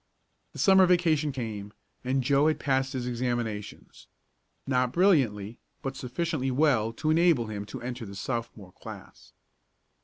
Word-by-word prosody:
The - - -11
Summer 190 -1 +6
vacation 160 -4 +2
came, 110 -6 -6 0.3
and 130 +1 0
Joe 140 +3 +3
had 155 - +1
passed 135 0 0
his 125 -2 -3
examinations. 120 -4 -4 0.6
Not 125 -2 +1
brilliantly, 125 - +2 0.2
but 135 0 -3
sufficiently 135 +2 -2
well 125 -5 +2
to 155 +6 -1
enable 165 -7 +3
him 105 -2 -5
to 105 - -8
enter 125 -2 -5
the 100 - -9
Sophomore 115 -3 -5
class. - - -12
130 Hz, 140 wpm, -28 LUFS, 115-150 Hz, 0.6 s, Summer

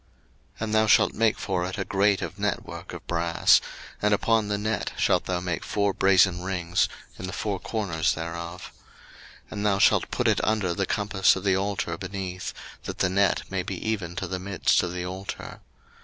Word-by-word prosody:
02:027:004 - - -18
And 110 -1 -2
thou 110 0 +4
shalt 110 0 +5
make 115 -1 +2
for 95 -3 -1
it 95 +3 -4
a 95 - -2
grate 100 +1 +2
of 100 - -6
network 105 -2 -3
of - - -9
brass; 85 -1 +3 0.4
and 105 0 +4
upon 110 0 +1
the 105 0 0
net 105 0 -2
shalt - - +2
thou 90 -1 -1
make 90 -1 -3
four 100 -1 0
brasen 95 -2 +4
rings 90 -2 0 0.3
in 90 - -5
the - - -5
four 100 0 -2
corners 85 -8 -1
thereof. 85 +2 -6
02:027:005 - - -27 0.7
And 105 0 -3
thou 100 -1 +3
shalt - - +4
put - - 0
it - - +2
under 105 -5 +1
the 95 +1 -1
compass 100 -2 +2
of 95 - -5
the 95 -2 +3
altar 95 -4 -2
beneath, 95 -1 -5 0.3
that - - -5
the 95 - +2
net 100 +1 +2
may 95 -1 0
be 95 +1 -4
even 95 -6 -2
to - - -3
the 95 - -4
midst 95 +1 +2
of 90 - -3
the 90 0 -4
altar. 95 +2 -6
95 Hz, 200 wpm, -26 LUFS, 90-105 Hz, 0.7 s, shalt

